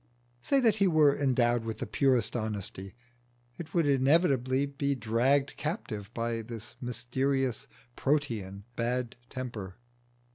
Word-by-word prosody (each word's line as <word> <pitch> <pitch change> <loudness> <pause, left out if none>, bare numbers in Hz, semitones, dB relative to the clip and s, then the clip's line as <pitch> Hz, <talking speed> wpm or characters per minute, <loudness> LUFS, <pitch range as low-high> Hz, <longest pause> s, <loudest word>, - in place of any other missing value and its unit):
Say 275 - +2
that 225 -4 +4
he 200 - +4
were 155 -4 +5
endowed 120 -4 +2
with 110 -1 -4
the 130 - -3
purest 125 -1 +2
honesty, 100 -3 -4 0.6
it 165 0 -8
would 170 -2 +3
inevitably 135 -1 +3
be 140 0 -1
dragged 130 +4 +1
captive 110 - -4
by 115 0 -1
this 115 0 -8
mysterious, 130 +1 -1 0.3
Protean 110 -9 -1
bad 120 +1 -1
temper. 110 -8 -6
125 Hz, 120 wpm, -30 LUFS, 115-140 Hz, 0.6 s, were